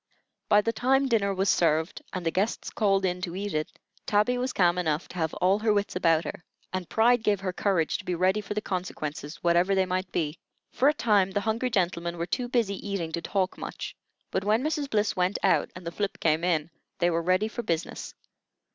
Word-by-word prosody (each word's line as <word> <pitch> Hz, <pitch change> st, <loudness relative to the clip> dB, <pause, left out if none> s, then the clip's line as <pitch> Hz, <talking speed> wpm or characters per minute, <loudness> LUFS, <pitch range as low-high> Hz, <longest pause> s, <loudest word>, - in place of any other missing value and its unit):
By 210 Hz, -1 st, +6 dB
the 230 Hz, +2 st, -1 dB
time 265 Hz, +4 st, +2 dB
dinner 215 Hz, -5 st, +2 dB
was 195 Hz, +1 st, 0 dB
served, 160 Hz, -2 st, +2 dB
and 180 Hz, -2 st, -5 dB
the 165 Hz, -, +2 dB
guests 195 Hz, +7 st, -1 dB
called 195 Hz, -3 st, +2 dB
in 180 Hz, 0 st, -1 dB
to 180 Hz, -2 st, -4 dB
eat 200 Hz, +1 st, -3 dB
it, 155 Hz, 0 st, -3 dB, 0.3 s
Tabby 210 Hz, +4 st, +3 dB
was 255 Hz, +1 st, -1 dB
calm 175 Hz, -1 st, +3 dB
enough 155 Hz, -2 st, -1 dB
to 180 Hz, -, -9 dB
have 160 Hz, -2 st, 0 dB
all 190 Hz, +3 st, +2 dB
her 220 Hz, 0 st, +2 dB
wits 205 Hz, -2 st, 0 dB
about 165 Hz, -3 st, +3 dB
her, -, -, -7 dB, 0.3 s
and 185 Hz, -2 st, -3 dB
pride 240 Hz, +2 st, +4 dB
gave 210 Hz, -3 st, +1 dB
her 185 Hz, -2 st, -2 dB
courage 180 Hz, -5 st, +1 dB
to -, -, -8 dB
be 180 Hz, -, -1 dB
ready 185 Hz, +4 st, +2 dB
for 210 Hz, -, -6 dB
the 210 Hz, -, 0 dB
consequences, 155 Hz, -5 st, -4 dB
whatever 175 Hz, +3 st, +3 dB
they 190 Hz, -1 st, +3 dB
might 185 Hz, 0 st, -2 dB
be. 155 Hz, -1 st, -2 dB, 0.3 s
For 275 Hz, -, +3 dB
a -, -, +2 dB
time 205 Hz, -7 st, +3 dB
the 200 Hz, +1 st, -1 dB
hungry 225 Hz, +4 st, 0 dB
gentlemen 175 Hz, -4 st, -1 dB
were 170 Hz, -, -2 dB
too 245 Hz, +7 st, -2 dB
busy 225 Hz, -6 st, +1 dB
eating 195 Hz, -5 st, -3 dB
to 170 Hz, -, -3 dB
talk 190 Hz, +1 st, -1 dB
much; -, -, -6 dB, 0.4 s
but 190 Hz, -, -1 dB
when 215 Hz, +5 st, +2 dB
Mrs. 300 Hz, -2 st, -1 dB
Bliss 210 Hz, -2 st, +1 dB
went 180 Hz, +2 st, +1 dB
out, 195 Hz, -, +3 dB
and 180 Hz, -1 st, -10 dB
the 170 Hz, -, -3 dB
flip 200 Hz, +3 st, -3 dB
came 160 Hz, 0 st, +2 dB
in, 165 Hz, -2 st, 0 dB, 0.3 s
they 175 Hz, -1 st, +2 dB
were 165 Hz, 0 st, +1 dB
ready 185 Hz, +5 st, +2 dB
for 230 Hz, +2 st, -5 dB
business. 170 Hz, -7 st, -3 dB
190 Hz, 220 wpm, -27 LUFS, 170-210 Hz, 0.4 s, By